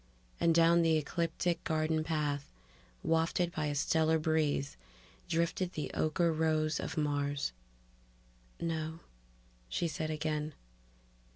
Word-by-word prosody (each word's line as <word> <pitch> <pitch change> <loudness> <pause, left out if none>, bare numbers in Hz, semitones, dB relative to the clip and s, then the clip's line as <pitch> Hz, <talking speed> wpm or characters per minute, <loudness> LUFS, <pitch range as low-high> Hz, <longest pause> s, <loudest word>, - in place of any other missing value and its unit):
And 165 -1 +3
down 170 +1 +6
the 165 -1 +4
ecliptic 170 +2 -1
garden 155 0 +1
path, 150 -3 -1 0.5
wafted 165 +2 +1
by 155 -3 -2
a 145 - -1
stellar 160 +2 +3
breeze, 155 -2 0 0.5
drifted 170 +2 0
the 150 - -3
ocher 165 +2 +2
rose 155 -1 +1
of - - -4
Mars... 145 - 0 1.1
"No," 160 0 -3 0.7
she 170 - 0
said 155 -1 -3
again. 155 -1 -2
160 Hz, 110 wpm, -33 LUFS, 150-165 Hz, 1.1 s, down